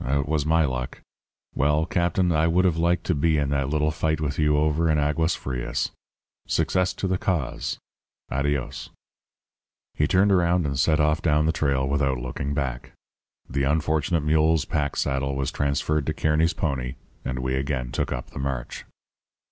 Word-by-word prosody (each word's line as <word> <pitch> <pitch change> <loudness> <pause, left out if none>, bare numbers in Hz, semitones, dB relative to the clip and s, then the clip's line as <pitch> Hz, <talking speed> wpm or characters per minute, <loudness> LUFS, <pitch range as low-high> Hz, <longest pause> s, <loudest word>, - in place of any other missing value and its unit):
It 70 +2 0
was 75 -1 0
my 80 0 +4
luck. 65 -2 -4 0.5
Well, 75 +3 +2
Captain, 85 +1 +1
I 80 0 +3
would 90 +3 +3
have 90 -3 +3
liked 85 +1 +1
to - - 0
be 80 +2 +2
in 70 -1 0
that 70 -1 0
little 75 +1 +1
fight 80 -1 -1
with 75 -1 -2
you 75 -1 +3
over 75 +2 +2
in 80 - +3
Aguas 80 +3 +1
Frias. 65 -3 -3 0.6
Success 90 0 +1
to 95 - -3
the 95 -1 0
cause. 85 -9 -2 0.5
Adios!' 70 -1 -2 1.0
"He 75 - +1
turned 100 +3 +3
around 90 -2 +3
and 70 -2 -2
set 75 +3 +3
off 75 +1 +2
down 75 -2 +2
the 80 - +3
trail 70 -4 0
without 70 -1 +1
looking 65 +3 -4
back. 65 -3 -3 0.5
The 70 - -2
unfortunate 80 +2 +1
mule's 80 +1 +3
pack 70 -2 -1
saddle 70 0 -1
was 70 0 -1
transferred 70 +1 0
to - - -1
Kearny's 80 +2 +2
pony, 65 -5 -2 0.3
and 65 - -3
we 65 +1 -2
again 65 -2 -2
took - - -2
up - - -5
the - - -8
march. 65 -3 -4
75 Hz, 170 wpm, -25 LUFS, 70-80 Hz, 1.0 s, my